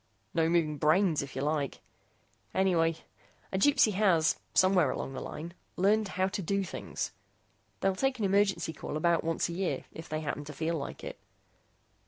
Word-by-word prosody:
"No 165 -1 +2
moving 155 -4 +1
brains, 160 +2 +3
if 140 -1 -8
you 135 - -2
like. 145 -2 -1 0.8
Anyway, 170 -4 +3 0.6
a 190 - +1
Gypsy 230 -3 +5
has 185 -6 +3 0.2
somewhere 185 -6 +5
along 135 - -3
the - - -5
line 165 +3 -6 0.2
learned 210 +3 +3
how 185 0 +3
to 195 - -3
do 195 +3 0
things. 185 - -4 0.7
They'll 195 -1 +2
take 270 +5 0
an 220 - 0
emergency 195 -4 +2
call 150 - -5
about 170 +1 +2
once 165 0 0
a 170 - -5
year 185 +1 -2
if 160 - -9
they 155 0 -2
happen 145 -1 -3
to 150 - -8
feel 160 +3 -1
like 140 -3 -5
it. - - -7
170 Hz, 175 wpm, -30 LUFS, 155-195 Hz, 0.8 s, Gypsy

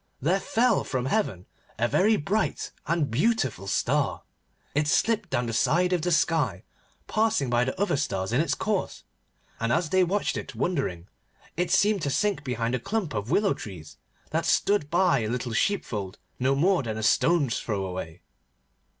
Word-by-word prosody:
There 175 +8 +1
fell 245 -1 +2
from 130 -2 -2
heaven 130 - -1 0.3
a 120 - +2
very 210 - +3
bright 205 +7 -1 0.2
and 160 -5 0
beautiful 135 - 0
star. - - 0 0.5
It 150 +1 +1
slipped 215 +6 +1
down 120 - 0
the 115 - -3
side 175 +10 +2
of 175 - +1
the 175 +2 -1
sky, 150 - +1 0.4
passing 215 - +1
by 120 0 +3
the 130 +7 -4
other 200 -6 +1
stars 95 -7 -2
in 130 - +3
its 165 - 0
course, 210 -3 -2 0.6
and, 115 +1 0
as 165 +2 +1
they 185 0 +4
watched 195 +4 0
it 135 - -7
wondering, 110 - -2 0.5
it 180 +2 -1
seemed 205 -2 +3
to - - -2
them - - 0
to - - +2
sink 200 -8 0
behind 120 -3 -2
a 125 - 0
clump 195 - -2
of 105 +1 -3
willow 200 +6 +3
trees 85 -7 -10 0.3
that - - 0
stood 205 -6 +2
hard - - -25
by 175 -4 +3
a 110 - -2
little 125 0 -3
sheepfold 110 - -1 0.2
no 135 +2 +2
more 180 +5 +3
than 110 -4 -4
a 110 - -4
stone's 140 +3 +2
throw 100 -4 -2
away. 90 -3 -6
145 Hz, 185 wpm, -26 LUFS, 115-190 Hz, 0.6 s, they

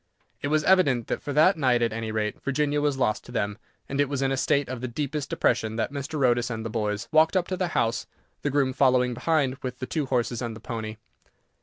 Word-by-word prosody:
It - - -1
was 155 +1 +2
evident 145 -11 +4
that, - - -2
for 145 - -5
that 155 +7 +5
night 125 -5 +3
at 115 -2 0
any 110 -1 -3
rate, 105 -1 -2
Virginia 145 +1 0
was 145 -2 +1
lost 125 -5 0
to - - -11
them; 105 -2 -2 0.3
and 140 +1 0
it 145 - +1
was 140 -1 -1
in 135 - +1
a - - +1
state 140 +1 +1
of 125 -2 -5
the 130 - -2
deepest 140 +3 -3
depression 110 0 +1
that 115 - -1
Mr. 140 0 -1
Otis 120 -1 +2
and 110 -1 -4
the 115 - -4
boys 105 0 -2
walked 160 +4 +4
up 180 - 0
to 185 - -1
the 185 -1 -1
house, 115 +1 0 0.3
the 145 - 0
groom 135 -2 +1
following 125 -2 +3
behind 135 0 +1
with 125 -1 -5
the 130 - -4
two 145 +2 -2
horses 125 -2 0
and 115 -2 -4
the - - -9
pony. 110 -2 -5
130 Hz, 245 wpm, -26 LUFS, 115-145 Hz, 0.3 s, that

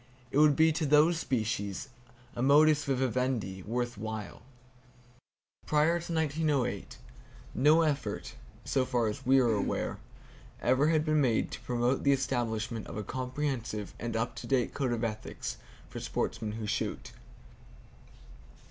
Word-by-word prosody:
It 140 - +2
would 150 -1 +6
be 160 +2 +5
to 155 0 -1
those 155 +3 +5
species 110 - -2 0.5
a 120 - -3
modus 145 +2 +5
vivendi 125 -7 -1
worth 120 +2 -3
while. 110 -1 -6 1.3
Prior 155 +3 +3
to 170 - -7
1908, 150 -9 -1 0.6
no 155 +5 +5
effort 150 -3 -2 0.3
(so 135 - +1
far 125 -2 0
as 130 +5 -7
we 135 +1 +6
are 120 -3 +3
aware) 100 - -1 0.6
ever 130 +4 +3
had 155 -1 +2
been 155 -1 +3
made 120 -5 +1
to - - -6
promote 125 +2 0
the 140 - +5
establishment 120 -4 -2
of - - -7
a 105 - -3
comprehensive 130 -4 -3
and 120 0 -4
up 115 +1 -1
to - - -7
date 130 -3 +1
code 135 -3 -1
of 120 0 -1
ethics 110 -2 -4 0.3
for - - -7
sportsmen 105 -1 -3
who 110 0 -5
shoot. 105 +1 -3
130 Hz, 140 wpm, -30 LUFS, 115-150 Hz, 1.3 s, would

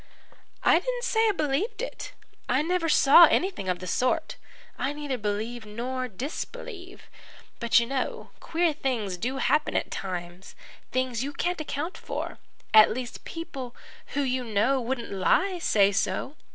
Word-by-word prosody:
"I - - +6
didn't - - -3
say 445 -1 +3
I - - +4
believed 310 - -1
it. - - -5 0.4
I 260 +4 +3
never 340 0 0
saw 295 +4 +8
anything 345 - 0
of 180 - +1
the 185 - -8
sort. 250 +8 0 0.4
I 275 - -2
neither 290 -2 -3
believe 215 +3 -3
nor 250 +4 -4
disbelieve. 360 - -7 0.6
But 235 -1 +4
you 235 - 0
know 265 +1 -3
queer 335 -1 +1
things 240 - -2
do 250 +9 -3
happen 300 +3 +1
at - - -1
times 180 -1 -6 0.4
things 255 -2 -1
you 285 +2 -4
can't 350 0 -1
account 310 +4 -4
for. - - -5 0.3
At 215 -1 +9
least, 245 +1 -5
people 270 -7 -7 0.4
who - - +3
you 260 -2 0
know 230 +4 +1
wouldn't 240 0 -3
lie 360 - +2
say 200 -10 +4
so. 205 +7 -1
260 Hz, 150 wpm, -27 LUFS, 220-325 Hz, 0.6 s, At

